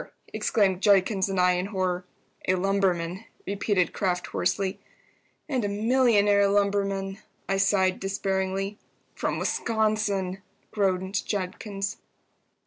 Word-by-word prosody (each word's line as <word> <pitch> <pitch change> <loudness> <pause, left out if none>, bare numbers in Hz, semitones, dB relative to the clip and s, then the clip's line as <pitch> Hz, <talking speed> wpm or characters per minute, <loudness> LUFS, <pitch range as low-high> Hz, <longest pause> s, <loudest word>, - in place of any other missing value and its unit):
exclaimed 190 -4 +1
Judkins 195 -1 +3
and 190 -1 -1
I, 180 0 +5
in 180 +1 -1
horror. 185 -3 -1 0.4
"A 185 - +4
lumberman," 185 -2 0 0.2
repeated 200 -2 0
Kraft, 180 -2 -1
hoarsely. 190 +2 -1 0.7
"And 260 -5 -1
a - - +1
millionaire 210 -2 +3
lumberman!" 200 -1 0 0.3
I 195 - +1
sighed, 195 -1 +2
despairingly. 195 +1 -2 0.3
"From - - -2
Wisconsin!" 215 -4 0 0.3
groaned 190 -1 0
Judkins. 195 +1 -3
195 Hz, 105 wpm, -26 LUFS, 185-205 Hz, 0.7 s, I